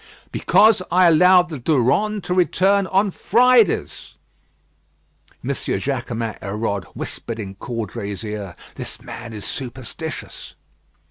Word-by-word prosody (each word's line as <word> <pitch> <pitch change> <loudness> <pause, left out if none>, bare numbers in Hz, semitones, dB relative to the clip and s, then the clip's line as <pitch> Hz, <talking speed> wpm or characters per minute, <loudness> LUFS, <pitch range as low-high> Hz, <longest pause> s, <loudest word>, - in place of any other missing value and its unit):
"Because 215 -2 +4
I 180 +1 +4
allowed 180 +2 +6
the 155 -4 -6
Durande 160 - +1
to 180 - -2
return 190 +2 +2
on 195 +2 +2
Fridays." 235 - +2 1.3
M. 125 - -4
Jaquemin 120 -5 -3
Hérode 100 -1 -3
whispered 115 - -5
in 95 -3 -6
Caudray's 105 -2 -5
ear: 105 -5 -6 0.2
"This - - -7
man 115 - -9
is 105 -2 -7
superstitious." 130 +5 -6
135 Hz, 110 wpm, -21 LUFS, 110-185 Hz, 1.3 s, allowed